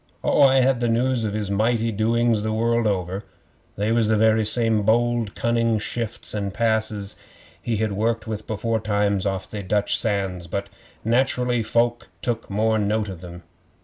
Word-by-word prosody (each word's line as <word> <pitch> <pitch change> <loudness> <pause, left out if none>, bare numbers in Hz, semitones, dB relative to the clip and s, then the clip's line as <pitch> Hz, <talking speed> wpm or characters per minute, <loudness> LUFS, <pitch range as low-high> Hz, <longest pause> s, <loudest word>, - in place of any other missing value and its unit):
Oh, - - +3
I 135 -1 +6
had 130 -1 +2
the 120 -1 0
news 120 +1 +1
of 105 -1 -2
his 105 -2 -3
mighty 115 +2 +1
doings 115 +1 +1
the 110 +1 -2
world 115 +1 +1
over. 95 0 -2 0.5
They 105 +2 -1
was 115 -1 +2
the 110 0 +2
very 110 0 +3
same 110 0 +2
bold, 115 0 +1
cunning 115 -1 +1
shifts 115 +2 -3
and 100 -2 -2
passes 110 -2 0 0.5
he'd 110 -2 -1
worked 110 +3 -1
with 110 -1 -5
beforetimes 105 -2 0
off 95 -1 -3
they 105 - -6
Dutch 100 +2 +1
sands, 95 -5 -1
but, 100 +3 -4 0.4
naturally, 125 0 +1
folk 120 +2 0
took 115 -2 -2
more 110 +2 +1
note 105 0 0
of 90 -3 -8
them. 85 -1 -10
110 Hz, 165 wpm, -23 LUFS, 105-115 Hz, 0.5 s, I